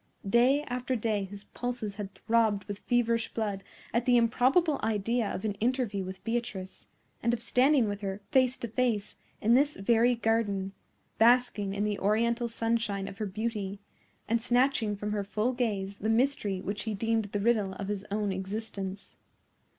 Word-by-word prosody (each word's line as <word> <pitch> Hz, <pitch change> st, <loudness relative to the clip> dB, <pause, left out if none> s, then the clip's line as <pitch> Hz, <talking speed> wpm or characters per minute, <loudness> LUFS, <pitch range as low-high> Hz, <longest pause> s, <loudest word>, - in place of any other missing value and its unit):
Day 250 Hz, +7 st, +4 dB
after 250 Hz, -1 st, -2 dB
day 215 Hz, -3 st, 0 dB
his 200 Hz, +1 st, -9 dB
pulses 240 Hz, -5 st, -4 dB
had 205 Hz, -2 st, -6 dB
throbbed 220 Hz, -3 st, +2 dB
with 205 Hz, 0 st, -6 dB
feverish 235 Hz, -1 st, +1 dB
blood 205 Hz, -3 st, -2 dB, 0.3 s
at 235 Hz, +2 st, 0 dB
the 245 Hz, -1 st, +6 dB
improbable 265 Hz, +7 st, +3 dB
idea 225 Hz, +1 st, 0 dB
of 190 Hz, -, -4 dB
an 210 Hz, -, 0 dB
interview 235 Hz, -5 st, 0 dB
with 185 Hz, +1 st, -8 dB
Beatrice, 225 Hz, -5 st, -4 dB, 0.3 s
and 235 Hz, +1 st, +2 dB
of -, -, -8 dB
standing 255 Hz, 0 st, +4 dB
with 205 Hz, 0 st, -4 dB
her, 195 Hz, 0 st, -3 dB
face 260 Hz, -2 st, +3 dB
to 235 Hz, -, -4 dB
face, 225 Hz, -3 st, -1 dB, 0.3 s
in 225 Hz, +3 st, +4 dB
this 285 Hz, +4 st, +4 dB
very 235 Hz, +4 st, +3 dB
garden, 220 Hz, -4 st, 0 dB, 0.5 s
basking 225 Hz, -4 st, +3 dB
in 205 Hz, -, 0 dB
the 210 Hz, -1 st, -1 dB
Oriental 235 Hz, +4 st, +1 dB
sunshine 225 Hz, -4 st, -1 dB
of 195 Hz, -, -9 dB
her 215 Hz, -, -1 dB
beauty, 205 Hz, -1 st, -3 dB, 0.5 s
and 230 Hz, +1 st, +1 dB
snatching 245 Hz, -3 st, +2 dB
from 210 Hz, +1 st, -4 dB
her 210 Hz, -1 st, -1 dB
full 210 Hz, +5 st, -1 dB
gaze 200 Hz, -5 st, -2 dB
the 215 Hz, -, -1 dB
mystery 225 Hz, -5 st, +1 dB
which 200 Hz, +3 st, -4 dB
he 220 Hz, -2 st, -2 dB
deemed 225 Hz, +1 st, 0 dB
the 205 Hz, 0 st, -3 dB
riddle 210 Hz, -3 st, +2 dB
of 195 Hz, +1 st, -6 dB
his 205 Hz, -1 st, -3 dB
own 205 Hz, 0 st, -1 dB
existence. 195 Hz, 0 st, -5 dB
220 Hz, 170 wpm, -29 LUFS, 200-240 Hz, 0.5 s, the